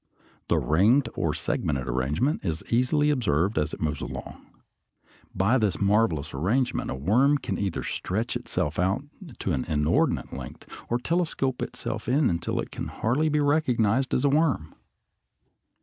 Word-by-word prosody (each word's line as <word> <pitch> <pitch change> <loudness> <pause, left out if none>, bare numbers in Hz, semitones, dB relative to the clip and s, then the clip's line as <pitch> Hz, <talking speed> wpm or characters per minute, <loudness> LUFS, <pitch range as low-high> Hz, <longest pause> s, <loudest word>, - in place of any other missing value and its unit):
The - - +2
ringed 105 - +3
or 75 -2 -1
segmented 70 -4 -2
arrangement 70 - 0
is 80 -4 -2
easily 145 +5 +3
observed 100 - +1
as 75 +1 -1
it - - -7
moves 75 -2 -2
along. - - -7 0.9
By 110 +8 +3
this 105 -4 0
marvelous 100 -7 +1
arrangement 110 - 0
a - - -2
worm 120 - +3
can 140 - -4
either 95 -4 -2
stretch 110 +6 -2
itself 75 +2 -2
out 95 +8 +1 0.3
to 95 - -2
an 70 - 0
inordinate 75 +1 +1
length, 65 -3 -8 0.2
or 120 - +2
telescope 155 -3 -1
itself - - -4
until 125 - +1
it - - -4
can - - -5
hardly 145 +8 0
be 150 0 +1
recognized 130 -5 +2
as 130 - +1
a - - +5
worm. 140 - +1
110 Hz, 150 wpm, -26 LUFS, -, 0.9 s, a